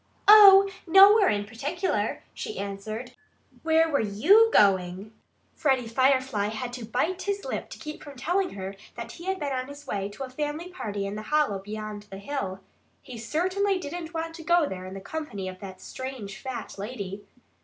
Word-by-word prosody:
"Oh, 395 -2 +10 0.2
nowhere 390 +3 +7
in 205 0 0
particular!" 290 - -2
she 435 -2 -6
answered. 215 +5 -5 0.5
"Where 325 0 +3
were 290 -3 +1
YOU 305 - +5
going?" 190 - +2 0.4
Freddie 265 -5 +1
Firefly 260 -3 +2
had 240 +3 -5
to 245 -2 -6
bite 310 - -1
his 400 0 -3
lip - - -4
to - - -9
keep 305 0 -8
from 285 -2 -10
telling 360 - -1
her 195 0 -6 0.2
that 235 0 -7
he 340 - -11
had 380 0 -1
been 285 -2 -2
on 255 0 -3
his 285 +1 -11
way 200 -1 -3
to 205 +7 -7
a 260 - -6
family 300 +5 -4
party 205 - -4
in 195 - -4
the 215 - -5
hollow 215 -4 +1
beyond 210 +1 -7
the 195 - -8
hill. 200 -4 -4 0.4
He 245 -3 -9
certainly 370 - 0
didn't 345 0 -6
want 330 -1 -4
to 325 - -9
go 345 -1 +3
there 185 -4 -6
in 190 - -8
the 195 - -7
company 205 -7 -5
of 185 0 -7
that 190 -1 -9
strange 255 -7 -7
fat 245 -6 -6
lady. 205 -2 -6
260 Hz, 185 wpm, -26 LUFS, 205-330 Hz, 0.5 s, Oh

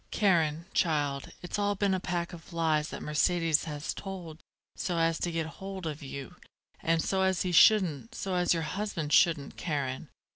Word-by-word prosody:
Karen, 170 -6 +2
child, 145 -5 0
it's 180 - -3
all 205 0 +1
been 200 0 +1
a 185 - +1
pack 175 0 -3
of 170 +1 -11
lies 160 -2 +1
that - - -7
Mercedes 160 +1 +2
has 150 -1 -4
told 180 -5 -7 0.4
so 175 -2 -2
as 165 0 +2
to 175 - -1
get 165 -1 -1 0.2
hold 190 -2 -6
of 155 0 -4
you, 135 -2 -8 0.4
and 165 0 +1
so 190 -1 0
as 190 -2 +2
he 180 - -1
shouldn't 195 - +4
so 190 - -3
as 180 -1 +2
your 165 -1 +2
husband 165 -3 -3
shouldn't, 165 -5 +3
Karen. 140 -6 -3
165 Hz, 180 wpm, -29 LUFS, 155-185 Hz, 0.4 s, shouldn't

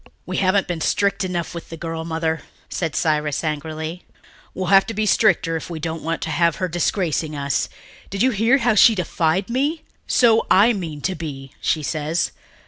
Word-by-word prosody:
"We 185 - -3
haven't 195 +1 +2
been 170 -2 -3
strict 200 +2 +1
enough 180 -2 -3
with 170 - -8
the 165 - -7
girl, 165 0 -4
Mother," 160 0 -2 0.3
said 165 -5 -3
Cyrus 150 -1 0
angrily. 155 +2 -4 0.5
"We'll 185 0 -2
have 195 0 +6
to 225 - -4
be 215 +1 0
stricter 200 -6 +3
if 160 - -5
we 165 -2 -5
don't 160 0 -4
want 165 +1 -2
to 160 - -3
have 170 +1 +2
her 185 - -1
disgracing 165 -2 -1
us. 140 -1 -1 0.4
Did 195 +2 -1
you 260 - +4
hear 225 +5 +3
how 245 -4 +2
she 220 +2 +6
defied 180 0 0
me? 285 +7 -1 0.2
'So 230 -2 +4
I 215 +5 +6
mean 165 -7 -5
to 190 - -1
be,' 140 -5 -7
she 155 - 0
says. 155 +3 -1
170 Hz, 190 wpm, -21 LUFS, 160-195 Hz, 0.5 s, have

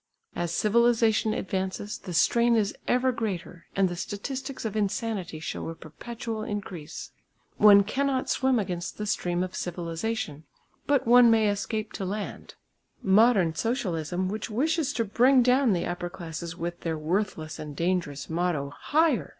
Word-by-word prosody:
As 175 -1 -2
civilisation 225 +2 +3
advances 190 +2 -3
the 185 -3 -7
strain 235 +7 +4
is 210 -3 +1
ever 255 +1 +3
greater 185 -7 -5
and 195 -1 +3
the 175 - -4
statistics 260 +9 -5
of 215 -1 -3
insanity 205 -4 -2
show 155 - -5
a 165 - -6
perpetual 225 +8 -6
increase. 200 -7 -6 0.5
One 205 -1 +8
cannot 265 +4 -1
swim 260 -1 +2
against 180 -5 -3
the 210 - -3
stream 175 -3 0
of 185 - -5
civilisation, 170 -2 -4 0.4
but 285 -2 +2
one 240 0 +7
may 220 -2 +4
escape 215 +1 -3
to 195 - -4
land. 205 +2 -5 0.5
Modern 195 -4 +4
Socialism 180 - -1
which 215 +4 -4
wishes 295 +6 0
to 230 -3 0
bring 250 +5 +4
down 255 0 +4
the 175 - -1
upper 175 0 -3
classes 170 -2 -7
with 175 0 -4
their 160 -2 -2
worthless 160 -1 -2
and 150 -2 -7
dangerous 165 -5 -1
motto 160 -4 -1
"Higher!" 295 - +1
200 Hz, 150 wpm, -27 LUFS, 175-235 Hz, 0.5 s, One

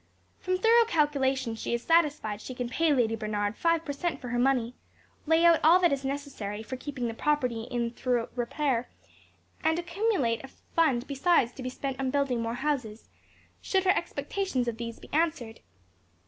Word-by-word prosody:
From 370 0 -1
thorough 460 +4 +5
calculation 270 - +1
she 225 +1 -2
is 235 - -5
satisfied 295 -11 +2
she 255 - -7
can 245 -1 -3
pay 325 +4 +2
Lady 235 -5 +2
Bernard 210 -1 -2
five 335 +3 +1
per 285 - -3
cent 335 +4 -2
for 250 - -7
her 240 0 -1
money, 250 -2 +2 0.5
lay 325 +2 +4
out 335 -1 +6
all 325 +4 +7
that 350 -3 +3
is 275 0 -2
necessary 270 -7 -4
for 260 - -6
keeping 255 -2 -4
the 230 - -3
property 250 -4 0
in 235 -1 -1
thorough 245 -1 -1
repair, 250 0 -1 0.7
and 320 +1 +2
accumulate 345 - 0
a - - -7
fund 270 -3 0
besides 280 -3 +2
to 265 - -10
be 255 - -3
spent 270 +1 -5
on 265 -1 0
building 270 -3 0
more 230 +1 -2
houses, 250 -6 -3 0.5
should 380 -1 +1
her 380 +1 +4
expectations 375 -16 -2
of 230 -1 -2
these 230 0 -6
be - - -15
answered. 290 -8 0
265 Hz, 180 wpm, -28 LUFS, 235-320 Hz, 0.7 s, all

